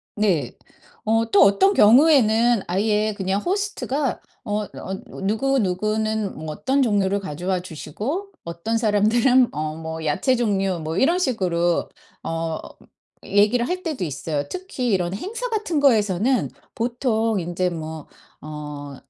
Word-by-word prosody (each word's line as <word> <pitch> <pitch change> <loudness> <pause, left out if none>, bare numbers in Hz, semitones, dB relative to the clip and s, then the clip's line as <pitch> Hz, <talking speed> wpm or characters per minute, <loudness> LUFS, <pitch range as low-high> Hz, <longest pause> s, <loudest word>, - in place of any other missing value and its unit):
네. 180 - +1 0.5
어 225 +1 +2
또 205 - +6
어떤 380 - +4
경우에는 235 -2 +5
아예 210 +3 +1
그냥 195 +1 -1
호스트가 355 - -2 0.2
어 210 0 -1
어 190 -1 -7 0.3
"누구누구는 215 -2 0
뭐 155 0 -7
어떤 265 - 0
종류를 200 -5 +1
가져와 180 +1 -3
주시고 225 - -5
어떤 170 +7 -3
사람들은 230 +4 +3
어 155 +1 -3
뭐 160 0 -6
야채 195 - +1
종류..." 195 -6 0
뭐 160 +1 -3
이런 335 +6 +3
식으로 180 - 0 0.3
어 165 -1 -3 0.6
얘기를 210 +5 +2
할 365 +2 -3
때도 310 - -3
있어요. 145 -1 -3
특히 365 -9 -4
이런 180 -4 0
행사 460 - -4
같은 420 -8 -1
거에서는 225 -2 +2 0.3
보통 230 -2 0
인제 175 +1 -1
뭐 160 -2 -7 0.3
어 150 -2 -7
210 Hz, 260 characters per minute, -22 LUFS, 175-250 Hz, 0.6 s, 또